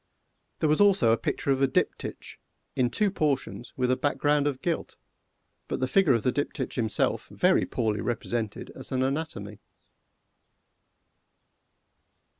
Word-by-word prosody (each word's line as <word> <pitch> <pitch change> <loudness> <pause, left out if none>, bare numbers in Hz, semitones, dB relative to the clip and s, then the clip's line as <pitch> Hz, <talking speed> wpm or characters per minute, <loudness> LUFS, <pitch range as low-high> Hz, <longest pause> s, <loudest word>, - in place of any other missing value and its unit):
There 155 - +3
was 155 +6 +3
also 195 - +5
a - - +5
picture 140 - -2
of 135 0 +1
a 135 - +5
Diptych, 130 - -2 0.4
in 125 -1 +2
two 205 - +1
portions, 145 -7 -1
with 125 -1 +1
a - - +4
background 145 +1 +1
of 135 -3 -3
gilt, 170 -2 -2 0.7
but - - -3
the 130 - 0
figure 175 -1 +4
of 115 -3 0
the 125 - +2
Diptych 135 -1 -3
himself 110 -4 0
very - - +2
poorly 110 -3 -1
represented 115 -2 -3
as - - -11
an 130 -1 +1
anatomy. 130 -8 -3
130 Hz, 140 wpm, -27 LUFS, 120-150 Hz, 0.7 s, also